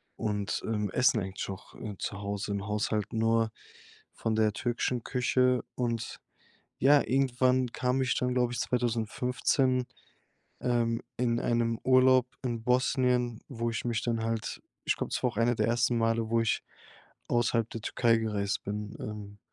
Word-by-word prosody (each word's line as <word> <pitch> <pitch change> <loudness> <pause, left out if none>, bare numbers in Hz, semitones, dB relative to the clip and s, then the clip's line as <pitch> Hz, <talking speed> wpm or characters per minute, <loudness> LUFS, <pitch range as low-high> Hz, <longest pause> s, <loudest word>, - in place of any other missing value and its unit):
und, 105 -2 -2
ähm, 105 -3 -1
essen 125 -1 +3
eigentlich 95 0 -4
auch, 95 -1 -8
äh, 105 -2 -6
zu 100 - -3
Hause 100 0 -3
im 100 -1 -3
Haushalt 105 0 -1
nur 115 0 +2 0.6
von 115 - -2
der 110 -1 +3
türkischen 120 0 -1
Küche. 125 0 +2
Und 115 -2 -2 0.6
ja, 145 +2 +6
irgendwann 130 -1 +2
kam 125 +1 0
ich 130 -1 +1
dann, 125 0 0
glaube 125 -1 +1
ich, - - -3
2015 125 +2 +1 0.8
ähm, 120 -2 +1 0.2
in 120 -1 +1
einem 115 -1 +1
Urlaub 130 -1 +5 0.2
in 120 -2 -2
Bosnien, 125 -2 +2
wo 115 -3 -2
ich 115 - -3
mich 120 -1 -1
dann 115 -2 -1
halt 115 -1 -2 0.3
ich - - +2
glaube - - -4
das - - -2
war 125 - +2
auch 105 - -16
eine 120 +1 +3
der 105 - +1
ersten 120 +1 +2
Male, 115 0 +1
wo 115 0 +3
ich 115 - +1 0.7
außerhalb 115 -1 +1
der 115 - -5
Türkei 115 0 +2
gereist 105 -3 -1
bin, 105 +1 -4
ähm, 105 -1 -7
115 Hz, 160 wpm, -29 LUFS, 110-125 Hz, 0.8 s, ja